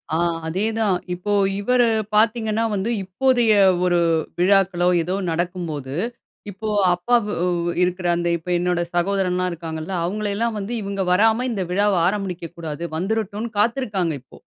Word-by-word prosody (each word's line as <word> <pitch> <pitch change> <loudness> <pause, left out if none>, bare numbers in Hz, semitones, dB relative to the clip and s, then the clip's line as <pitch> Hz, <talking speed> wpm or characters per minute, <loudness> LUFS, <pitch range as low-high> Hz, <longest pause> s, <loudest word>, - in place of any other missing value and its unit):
ஆ - - +2 0.3
அதே 190 +7 -1
தான் 210 -5 +2 0.2
இப்போ 180 +4 -4 0.3
இவரு 245 +3 +3 0.3
பாத்தீங்கன்னா 220 0 +2
வந்து 200 +3 -1
இப்போதைய 235 +4 +2 0.3
ஒரு 175 -1 +3 0.4
விழாக்களோ 180 -1 +3
ஏதோ 180 +3 -2 0.2
நடக்கும்போது, 165 -5 -3 0.6
இப்போ 205 +3 -7 0.3
அப்பா 180 +8 +1
வு 210 - -3 0.5
இருக்குற 180 0 -1
அந்த 175 0 -1
இப்ப 170 +2 -10
என்னோட 180 0 0
சகோதரன்லா 185 0 +1
இருக்காங்கல்ல 160 +1 -6
அவங்களையெல்லாம் 215 +4 -2
வந்து 205 +5 -4
இவங்க 200 -1 -3
வராம 225 +6 +3
இந்த 200 -5 -2
விழாவ 205 +2 +2
ஆரம்பிடிக்க 185 -4 -3
கூடாது 160 -1 -5
வந்துறட்டுனு, 215 +4 -2
காத்துருக்காங்க 210 -7 0
இப்போ. 130 - -17
195 Hz, 130 wpm, -22 LUFS, 175-215 Hz, 0.6 s, இவரு